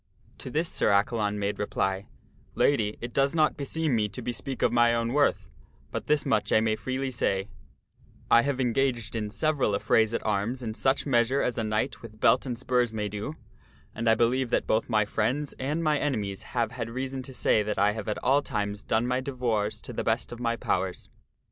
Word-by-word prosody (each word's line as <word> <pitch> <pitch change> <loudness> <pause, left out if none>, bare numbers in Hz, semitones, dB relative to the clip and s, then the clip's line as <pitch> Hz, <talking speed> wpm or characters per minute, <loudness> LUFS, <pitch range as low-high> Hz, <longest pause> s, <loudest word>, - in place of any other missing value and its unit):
To - - -7
this 160 +6 0
Sir - - +1
Accalon 105 +1 +1
made 100 0 -2
reply, 95 0 -1 0.2
" - - -32
Lady, 110 -7 +2
it 120 0 -6
does 140 +3 +2
not 155 -2 +3
beseem 150 0 -1
me 105 -2 +1
to 125 +5 -7
be 125 - -2
speak 135 +1 -4
of - - +3
my 120 0 +4
own 115 +1 -1
worth, 145 0 +2 0.4
but - - -4
this 150 -1 +2
much 105 -2 +1
I - - +5
may 110 0 +1
freely 130 +3 -3
say; 100 -4 -1 0.8
I 115 - +8
have 140 0 -1
engaged 120 -2 0
in 105 -2 -2
several 140 -2 +1
affrays 110 +2 +3
at - - -3
arms 110 +5 -1
in 110 -2 -3
such 130 +4 +1
measure 130 0 +2
as 125 - 0
a - - 0
knight 110 +5 -1
with 110 -2 -12
belt 130 +4 +4
and 120 -2 -3
spurs 125 -2 +1
may 105 -2 -3
do, 105 +10 -5 0.6
and 115 +1 0
I 110 - +6
believe 120 +2 +1
that - - +1
both 110 +2 0
my 110 -2 +3
friends 125 +8 -1
and 150 +5 -1
mine 150 -2 +2
enemies 105 -9 -2 0.2
have 115 -1 +1
had 115 -1 -4
reason 130 +2 -4
to 130 +1 -9
say 115 -4 +2
that 105 0 -2
I 100 +2 +4
have 110 0 -6
at 105 - -1
all 135 +3 +4
times 105 -6 -3
done 110 +2 +1
my 125 +1 0
devoirs 120 -6 -2
to - - -6
the - - -2
best - - 0
of 120 - -7
my 115 -1 0
powers." 95 -4 -2
115 Hz, 215 wpm, -27 LUFS, 105-130 Hz, 0.8 s, I